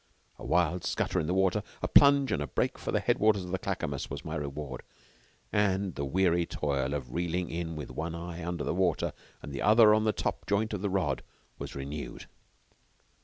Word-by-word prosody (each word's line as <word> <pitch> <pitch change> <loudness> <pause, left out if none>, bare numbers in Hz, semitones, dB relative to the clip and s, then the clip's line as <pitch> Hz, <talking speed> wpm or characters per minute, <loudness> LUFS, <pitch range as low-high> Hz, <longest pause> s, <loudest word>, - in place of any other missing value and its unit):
A - - -9
wild 85 0 +1
scutter 90 - 0
in 75 - -1
the 90 - +1
water, 95 +2 +2 0.2
a - - +2
plunge, 140 -3 +6
and 100 - 0
a 75 - -2
break - - -1
for - - -3
the - - +2
head - - +1
waters 105 -3 +3
of 90 - -7
the 95 - -1
Clackamas 70 -1 -3
was - - -6
my - - -4
reward, 70 -2 -4 0.7
and 100 -2 +1
the 70 - -4
weary 85 +3 +2
toil 70 -3 -1
of 65 -4 -5
reeling 85 +1 -1
in 85 -1 -3
with 75 -3 -6
one 80 +1 -4
eye 85 0 -6
under 85 -2 -3
the - - -1
water 90 -1 +1 0.3
and 75 - -7
the 70 - -4
other 110 0 +7
on 110 0 +3
the 110 - +4
top - - -3
joint 105 +2 +1
of 100 - -3
the 100 - 0
rod 90 -8 0 0.4
was - - -6
renewed. 70 +2 -6
85 Hz, 210 wpm, -30 LUFS, 75-100 Hz, 0.7 s, other